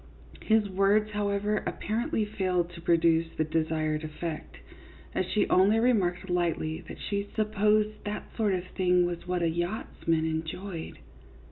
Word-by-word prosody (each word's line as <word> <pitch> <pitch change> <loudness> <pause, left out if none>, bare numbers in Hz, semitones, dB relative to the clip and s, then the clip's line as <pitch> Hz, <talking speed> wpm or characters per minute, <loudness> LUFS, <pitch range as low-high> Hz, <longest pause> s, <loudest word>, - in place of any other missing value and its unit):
His 220 -1 +3
words, 200 +3 +2
however, 205 0 0
apparently 225 +1 -1
failed 185 -4 -1
to 170 -1 -10
produce 165 -1 +3
the 155 - +2
desired 155 -1 -1
effect, 155 +1 -6 0.6
as 185 - 0
she 210 +2 +1
only 195 +4 +4
remarked 195 -7 +2
lightly 170 -2 -1
that - - -8
she 200 0 -3
" - - -20
supposed 215 0 +1
that 210 0 -6
sort 210 -4 +2
of 180 0 -4
thing 180 -1 +3
was 175 0 -4
what 180 -1 0
a - - +3
yachtsman 165 -2 -1
enjoyed." 160 +2 -4
185 Hz, 145 wpm, -28 LUFS, 165-210 Hz, 0.6 s, only